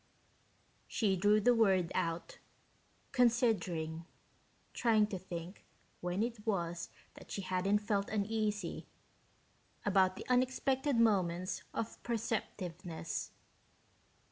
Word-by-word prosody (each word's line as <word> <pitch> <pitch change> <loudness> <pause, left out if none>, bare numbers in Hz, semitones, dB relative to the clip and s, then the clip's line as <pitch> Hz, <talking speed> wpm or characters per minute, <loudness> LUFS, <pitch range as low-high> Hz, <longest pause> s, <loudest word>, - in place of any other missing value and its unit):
She 200 -4 +1
drew 205 +3 +4
the 245 +3 +5
word 190 -7 +3
out, 165 0 -2 0.7
considering, 210 -10 +2 0.7
trying 220 -3 +4
to 200 -3 -5
think 175 0 -7 0.4
when 180 +4 -1
it 230 -2 -4
was 175 -5 -1 0.2
that - - -14
she 195 - -4
hadn't 185 +3 +2
felt 205 -1 -1
uneasy 210 -2 -1 1.0
about 190 -2 +4
the - - -8
unexpected 260 +2 +2
moments 185 -5 +2
of 225 - -4
perceptiveness. 185 -7 -3
205 Hz, 95 wpm, -34 LUFS, 180-225 Hz, 1.0 s, the